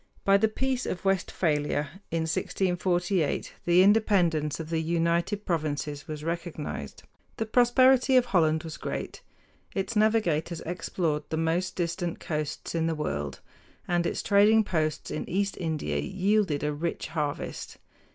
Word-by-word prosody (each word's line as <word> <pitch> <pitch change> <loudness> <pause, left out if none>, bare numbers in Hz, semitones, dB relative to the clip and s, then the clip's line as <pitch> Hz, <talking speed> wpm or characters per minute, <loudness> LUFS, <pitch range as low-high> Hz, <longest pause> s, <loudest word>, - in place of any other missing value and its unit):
By 195 0 +6
the 220 +2 +3
Peace 260 +3 -2
of 185 - -4
Westphalia 155 -3 0
in 165 0 -1
1648 175 0 0
the 175 +1 +6
independence 180 -8 +3
of 160 0 -6
the 165 -1 +1
United 170 +5 0
Provinces 150 -2 -2
was 155 -1 -6
recognized. 165 - -5 0.3
The 225 - -1
prosperity 255 +3 +5
of 250 - +4
Holland 160 -8 +2
was 160 -1 -7
great. - - -5 0.5
Its 195 +4 -2
navigators 180 -7 +1
explored 165 -3 -2
the 160 - -2
most 165 +3 0
distant 170 0 -2
coasts 150 -2 -4
in 165 -1 0
the 165 - 0
world, 75 - -3 0.5
and 175 -1 +1
its - - -3
trading 210 +2 +5
posts 155 -6 -1
in - - -4
East 200 +2 0
India 160 -4 -2
yielded 195 -5 +1
a 150 0 0
rich 165 +3 -3
harvest. 150 -3 -4
170 Hz, 140 wpm, -27 LUFS, 155-200 Hz, 0.5 s, By